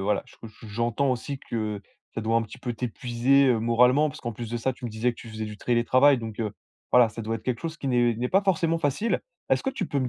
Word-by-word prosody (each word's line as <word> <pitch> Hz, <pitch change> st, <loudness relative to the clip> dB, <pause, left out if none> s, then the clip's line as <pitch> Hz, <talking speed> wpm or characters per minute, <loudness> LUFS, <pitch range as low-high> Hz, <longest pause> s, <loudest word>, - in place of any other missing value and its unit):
voilà, 100 Hz, 0 st, +1 dB
je -, -, -18 dB
co 115 Hz, -, -10 dB
j 110 Hz, -, -19 dB
j'entends 120 Hz, +5 st, 0 dB
aussi 130 Hz, +3 st, -3 dB
que 110 Hz, -5 st, -3 dB, 0.3 s
ça 110 Hz, -, -2 dB
doit 115 Hz, +1 st, +1 dB
un 115 Hz, -, +3 dB
petit 110 Hz, -, -10 dB
peu 120 Hz, -2 st, -4 dB
t'épuiser, 125 Hz, +3 st, +2 dB
heu, 120 Hz, -3 st, +3 dB
moralement, 125 Hz, +6 st, +4 dB
parce -, -, -11 dB
qu'en 120 Hz, -2 st, -4 dB
plus 115 Hz, +1 st, -7 dB
de 120 Hz, -, -2 dB
ça, 130 Hz, +3 st, 0 dB
tu 125 Hz, -, -12 dB
me 120 Hz, -, -3 dB
disais 115 Hz, +3 st, 0 dB
que -, -, -20 dB
tu 115 Hz, -, -10 dB
faisais 110 Hz, 0 st, -4 dB
du 105 Hz, 0 st, -8 dB
télétravail. 125 Hz, +4 st, +4 dB
Donc, 115 Hz, -1 st, -6 dB
heu, 105 Hz, -2 st, -2 dB, 0.4 s
voilà, 125 Hz, -2 st, +7 dB
ça 115 Hz, +1 st, -7 dB
doit 115 Hz, +1 st, -2 dB
être 110 Hz, -, -13 dB
quelque 125 Hz, -1 st, -2 dB
chose 165 Hz, 0 st, -4 dB
qui 135 Hz, -, -3 dB
n'est 120 Hz, -2 st, +3 dB
n'est 125 Hz, +3 st, -2 dB
pas 195 Hz, +2 st, +3 dB
forcément 165 Hz, -4 st, +1 dB
facile! 165 Hz, -, 0 dB, 0.3 s
Est-ce -, -, +3 dB
que 270 Hz, -, 0 dB
tu -, -, -3 dB
peux 145 Hz, -, -1 dB
me 130 Hz, -, -1 dB
120 Hz, 280 wpm, -26 LUFS, 115-135 Hz, 0.4 s, voilà